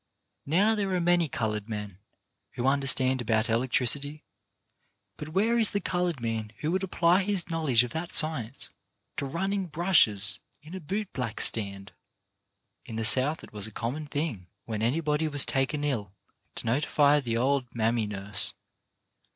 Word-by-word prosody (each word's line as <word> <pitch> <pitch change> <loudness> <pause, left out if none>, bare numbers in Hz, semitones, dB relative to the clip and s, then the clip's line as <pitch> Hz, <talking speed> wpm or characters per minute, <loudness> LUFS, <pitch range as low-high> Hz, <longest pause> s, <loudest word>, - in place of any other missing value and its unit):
Now 195 +9 +3
there 205 -3 -1
are - - +1
many 175 -2 +2
coloured 105 -4 -3
men 105 -3 -6 0.5
who 125 0 -4
understand 135 -1 +2
about 110 -1 +1
elec 115 +3 0
tricity, 145 +5 +2 0.9
but 150 +6 -8
where 220 +8 +1
is 220 - +4
the 200 - -2
coloured 175 -5 -2
man 115 -2 -4
who 155 +1 -1
would 185 +1 0
apply 180 -1 +2
his 190 -3 0
knowledge 145 -8 +2
of 120 - -6
that 165 +4 -5
science 140 -6 -1 0.5
to 140 - -3
running 190 +5 -2
brushes 110 - +3 0.2
in 155 +4 -12
a 190 - -5
boot 195 +5 -4
black 115 -4 -4
stand? 100 -1 +1 0.9
In 115 - -9
the 110 0 -2
South 135 +7 +3
it - - -14
was 105 0 -3
a - - -11
common 130 +8 -4
thing 145 - -4 0.2
when 110 -2 -4
any 125 +9 0
body 150 0 0
was 145 -2 +5
taken 135 +2 -1
ill 115 -10 -2 0.4
to - - -7
notify 145 +4 +2
the 115 -4 -2
old 130 +1 0
mammy 115 -1 0
nurse. 105 0 +2
140 Hz, 165 wpm, -27 LUFS, 115-165 Hz, 0.9 s, was